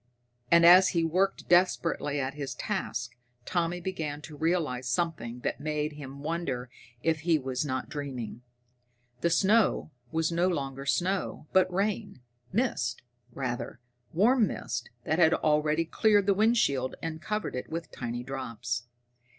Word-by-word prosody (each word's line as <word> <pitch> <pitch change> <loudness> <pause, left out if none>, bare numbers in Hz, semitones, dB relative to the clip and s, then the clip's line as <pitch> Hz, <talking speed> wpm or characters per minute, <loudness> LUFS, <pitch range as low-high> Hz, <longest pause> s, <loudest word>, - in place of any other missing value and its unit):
And 170 +2 +6
as 180 +2 +9
he 165 - +3
worked 185 +4 0
desperately 170 -4 +2
at 135 0 -2
his 140 -2 -5
task 125 - -3 0.3
Tommy 175 0 0
began 160 -5 -4
to 155 - -9
realize 155 -6 0
something 125 -5 -2
that - - -2
made 150 0 -2
him 140 -1 -9
wonder 140 -7 -3 0.3
if 160 -1 +2
he 165 +1 +3
was 130 -2 -2
not 130 -3 -2
dreaming. 130 -6 -5 0.8
The 170 - +2
snow 200 -1 +3 0.2
was 160 +1 0
no 170 +2 +2
longer 140 -5 -3
snow, 180 +1 0
but 185 -1 +4
rain 200 - -1 0.3
mist, 215 - -1 0.3
rather, 120 -3 -4 0.3
warm 220 +6 +4
mist 120 0 -4
that 160 +6 0
had 160 -1 +6
already 150 +1 +2
cleared 205 +3 +3
the 200 - +4
windshield 190 - +2
and 160 -1 -4
covered 215 -4 -3
it 125 - -5
with 165 0 -5
tiny 120 0 -4
drops. 125 -2 -4
155 Hz, 140 wpm, -29 LUFS, 130-180 Hz, 0.8 s, as